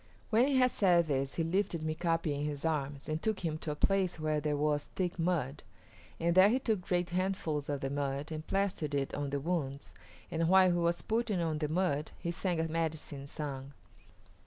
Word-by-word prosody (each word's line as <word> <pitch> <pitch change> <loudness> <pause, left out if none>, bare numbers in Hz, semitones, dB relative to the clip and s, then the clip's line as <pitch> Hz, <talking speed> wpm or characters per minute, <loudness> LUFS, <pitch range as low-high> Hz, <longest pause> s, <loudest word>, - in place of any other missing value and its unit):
When 235 +4 +5
he 280 - +1
had 255 -1 +5
said 175 -4 +4
this 135 -2 -1
he 165 - 0
lifted 175 0 0
Mika´pi 165 0 0
in 145 - -3
his 150 0 -3
arms 145 -3 -2
and 155 +1 -2
took 220 -2 -1
him 155 -3 -2
to 155 - -5
a 150 - -1
place 190 0 +1
where 155 -1 0
there 150 -1 -1
was 145 0 +1
thick 180 -2 -2
mud, 165 -5 0 0.6
and 170 +1 +2
there 185 +3 +7
he 245 - +3
took 220 -7 0
great 175 -1 -1
handfuls 175 -6 -1
of 140 -1 -2
the 135 - -2
mud 140 +1 -2
and 155 0 -5
plastered 190 -7 0
it 135 -1 -1
on 145 -1 -2
the 140 0 -1
wounds, 140 -3 -3 0.4
and 165 0 +1
while 190 -1 +6
he 175 - +1
was 170 0 +1
putting 220 -3 0
on 160 -2 -1
the 150 -1 -1
mud 155 -3 0
he 170 - -3
sang 175 0 -1
a 160 - +1
medicine 155 -3 -3
song. 140 -2 -5
160 Hz, 205 wpm, -32 LUFS, 145-180 Hz, 0.6 s, there